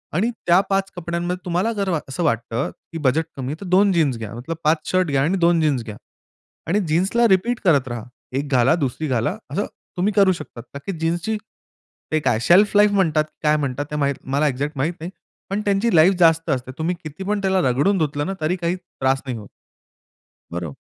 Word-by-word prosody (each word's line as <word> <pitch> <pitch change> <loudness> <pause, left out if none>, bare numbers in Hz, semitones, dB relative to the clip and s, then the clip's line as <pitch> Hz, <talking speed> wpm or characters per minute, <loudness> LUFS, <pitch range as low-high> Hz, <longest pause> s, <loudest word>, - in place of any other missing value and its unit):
आणि 210 +8 +2 0.2
त्या 175 +2 +6
5 195 0 0
कपड्यांमध्ये 175 +1 -3
तुम्हाला 180 +6 0
जर 200 -2 -2
वा 165 -4 +1
असं 170 +6 -3
वाटतं 115 -1 -1 0.2
की 165 - -5
बजेट 155 +5 +3
कमी 130 -2 -5
आहे - - -3
तर - - -6
2 195 +2 +5
जीन्स 150 -8 +2
घ्या. 110 -2 -7
मतलब 130 +8 -5
5 155 0 +1
शर्ट 185 -1 +2
घ्या 135 -1 +2
आणि 185 +5 +1
2 170 -1 +3
जीन्स 140 -6 +1
घ्या. 105 - -7 0.7
आणि 190 +6 +2
जीन्सला 190 +9 +2
रिपीट 220 +5 +2
करत 145 -8 +3
राहा. 120 -2 -5 0.3
एक 140 +2 -1
घाला, 130 +3 +4
दुसरी 155 0 -2
घाला 125 - 0
असं 205 - -1 0.3
तुम्ही 200 +4 +1
करू 195 -1 +5
शकता. 155 -8 -6
का 135 +3 -11
की - - -2
जीन्सची 175 +7 -1 0.7
ते 155 - +2
काय 115 -7 +1
शेल्फ 195 +10 +5
लाईफ 210 0 +6
म्हणतात 165 -6 +2 0.2
काय 150 0 +3
म्हणतात? 140 -1 -2
ते - - -3 0.4
मला 145 +2 +2
एक्झॅक्ट 145 +3 -2
माहित 150 +6 0
नाही. 170 +3 -6 0.4
पण 200 +2 -1
त्यांची 200 +1 +2
लाईफ 165 +4 +6
जास्त 165 -1 +4
असते. 130 -2 -1
तुम्ही 165 +3 -1
किती 155 +4 -7
पण 205 +1 -1
त्याला 190 -1 +2
रगडून 160 +11 +2
धुतलं 145 -2 -1
ना, 195 - -2
तरी 155 +4 +1
काही 175 -1 -1
त्रास 135 -7 -2
नाही 125 -3 -4
होत. 105 - -10 1.1
बरो 85 -3 -4
165 Hz, 205 wpm, -21 LUFS, 140-190 Hz, 1.1 s, त्या